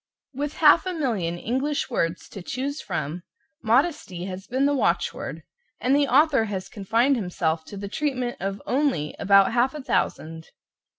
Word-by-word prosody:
With 285 +3 -3
half 320 +3 +5
a 370 - -1
million 210 - -1
English 265 +9 -2
words 165 -6 -1
to 195 - -8
choose 270 - -4
from, 165 -1 -4 0.4
modesty 230 - +1
has 190 0 -7
been 260 +3 +1
the 285 - +3
watchword, 280 - -1 0.4
and 260 +2 +2
the 285 0 +3
author 275 -2 +4
has 195 -3 -5
confined 230 +7 +1
himself 170 -5 -1
to 200 - -9
the 200 +1 -5
treatment 255 +1 -2
of 195 +1 -4
only 255 - 0
about 195 +1 +5
half 250 +4 +2
a 300 - -6
thousand. 160 - -2
235 Hz, 160 wpm, -25 LUFS, 185-280 Hz, 0.4 s, half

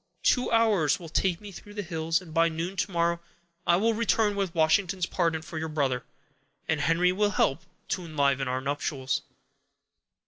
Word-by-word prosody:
Two 250 - +2
hours 215 - +3
will 170 -2 -9
take 175 +1 +1
me 205 -1 -10
through 205 +2 -12
the 205 - -3
hills; 165 -1 -1
and 165 -4 -12
by 165 +1 +4
noon 165 +4 -4
to 200 - -1
morrow 170 0 +1 0.5
I 170 - +6
will 225 +5 +2
return 220 -2 +2
with 195 -3 -2
Washington's 175 +3 +2
pardon 165 -3 0
for 160 -1 -6
your 160 0 -3
brother, 135 -5 0 0.6
and 155 -2 0
Henry 170 +3 +3
will 205 +3 +2
help 160 -6 +1 0.3
to 185 - -1
enliven 140 -4 +1
our 130 +1 -1
nuptials." 135 -1 -2
170 Hz, 175 wpm, -27 LUFS, 155-195 Hz, 0.6 s, I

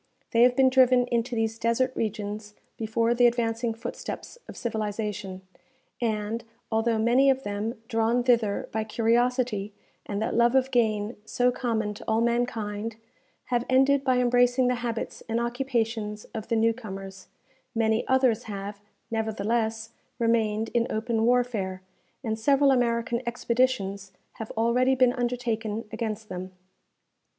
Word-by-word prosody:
They 230 - +3
have 245 +1 +6
been 260 0 +5
driven 255 -1 +5
into 240 +1 0
these 225 0 -1
desert 235 +3 +1
regions 210 -1 -4 0.2
before 230 +1 +1
the 240 0 +5
advancing 230 -1 0
footsteps 240 - -7
of - - -10
civilization, 210 -4 -3 0.6
and, 220 0 -1 0.3
although 225 +1 +2
many 240 +5 +4
of 265 0 +2
them, 205 +3 -3
drawn 230 +2 +1
thither 230 -5 +2
by 220 0 -1
curiosity 230 -2 0 0.3
and 200 -1 -2
that 220 - -1
love 235 +2 +3
of 265 0 +3
gain 220 -2 +1
so 245 +3 +1
common 225 -4 -1
to 205 - -11
all 220 0 +2
mankind, 230 -2 -1 0.6
have 240 -1 +2
ended 270 +2 +4
by 260 -2 +2
embracing 245 +1 +3
the - - +2
habits 230 -2 -4
and 225 +1 +1
occupations 235 -4 -2
of 220 -2 -5
the 230 - 0
new 225 +1 +3
comers, 195 -4 -9 0.5
many 220 0 +2
others 260 -4 +2
have, 205 -1 -6 0.3
nevertheless, 220 +1 -1 0.3
remained 225 -2 +1
in 235 -1 +1
open 225 0 0
warfare, 220 -7 0 0.4
and 220 -2 -2
several 275 +3 +4
American 235 -1 +1
expeditions 235 -5 0 0.2
have 220 - -6
already 250 +3 +3
been 255 -1 +4
undertaken 235 -3 -2
against 220 -2 -4
them. 185 0 -6
230 Hz, 140 wpm, -27 LUFS, 215-245 Hz, 0.6 s, have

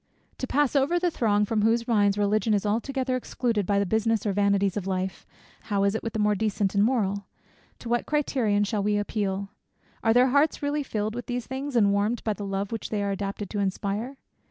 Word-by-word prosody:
To 255 - -3
pass 290 +1 +1
over 280 +6 +3
the 350 0 +1
throng 210 -6 +2
from 215 0 0
whose 230 +2 +2
minds 205 -3 +3
Religion 210 +2 +2
is 205 - -1
altogether 255 +4 -1
excluded 235 -5 -1
by 200 - +2
the 200 - +2
business 220 +2 +1
or - - +1
the 200 +1 0
vanities 200 -1 +2
of 200 -3 -3
life, 190 0 -3 0.4
how 200 -1 +1
is 200 0 +2
it 220 - -2
with 230 - -5
the - - -2
more 210 0 +3
decent 205 -1 0
and 200 0 +3
moral? 200 -5 0 0.5
To - - -10
what 240 0 0
criterion 250 -9 +1
shall 205 0 -1
we 205 +1 +1
appeal? 200 -1 -2 0.5
Are 225 - +4
their 250 +3 +5
hearts 285 +3 +2
really 290 +1 0
filled 215 -5 -2
with 245 +1 -6
these 245 -1 -3
things, 265 +1 -5
and 205 -4 +4
warmed 210 +4 0
by 215 - 0
the 205 -1 -6
love 195 0 -3
which 225 -2 -4
they 210 -2 -1
are 200 - -1
adapted 200 0 -4
to 210 - -2
inspire? 200 +6 -2
210 Hz, 225 wpm, -26 LUFS, 200-245 Hz, 0.5 s, their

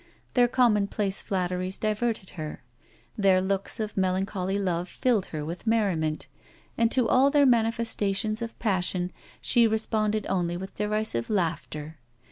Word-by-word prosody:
Their 245 -1 +5
commonplace 210 -5 +1
flatteries 185 0 -2
diverted 215 -2 -1
her; 155 -5 -7 0.5
their 195 -2 +4
looks 195 +4 -1
of 215 -1 -3
melancholy 190 0 0
love 180 -3 -1
filled 235 -7 +1
her 150 -2 -5
with 170 +7 -7
merriment; 180 -9 +1 0.5
and 230 -1 +2
to 250 -3 +3
all 260 +4 +5
their 285 0 +4
manifestations 225 -3 +1
of 230 0 -5
passion 185 -3 0 0.3
she 235 -2 +4
responded 215 -1 0
only 175 -2 -1
with 190 +2 -7
derisive 210 - -1
laughter. 160 -5 -2
200 Hz, 130 wpm, -27 LUFS, 180-225 Hz, 0.5 s, Their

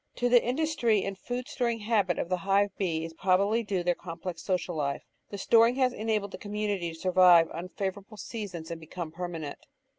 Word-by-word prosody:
To 245 0 +1
the 245 -1 +6
industry 245 -6 +1
and 195 0 -3
food 245 +6 -5
storing 235 -3 -1
habit 205 -5 +1
of - - -2
the 185 +1 0
Hive 195 +2 +1
Bee 165 -4 -1
is 165 - -8
probably 195 +6 +2
due 195 -5 -2
their 175 0 +2
complex 170 0 -7
social 180 -2 -1
life; 140 -2 -2 0.3
the 200 - -6
storing 230 +4 +4
has 255 -2 +2
enabled 215 -2 -1
the - - -8
com 205 0 -8
munity 205 -5 -1
to 165 - -11
survive 180 -2 +6
unfavourable 190 +4 -5
seasons 180 -8 -6
and 165 -1 -6
become 160 0 -6
permanent. 165 -3 -5
195 Hz, 190 wpm, -29 LUFS, 175-220 Hz, 0.3 s, the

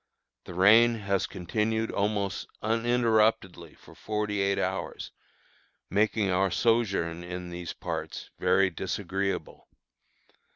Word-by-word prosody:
The 90 - -9
rain 110 +6 +6
has 100 -3 -1
continued 110 +4 -1
almost 100 -2 -1 0.2
uninterruptedly 110 -6 +1
for - - -17
forty 105 -1 -2
eight 100 0 +1
hours, - - -3 0.8
making 105 0 +2
our 95 +1 +2
sojourn 95 -7 +1
in 90 0 -6
these 85 -1 -6
parts - - -6
very 95 -1 +3
disagreeable. 95 +3 -3
100 Hz, 100 wpm, -28 LUFS, 90-110 Hz, 0.8 s, rain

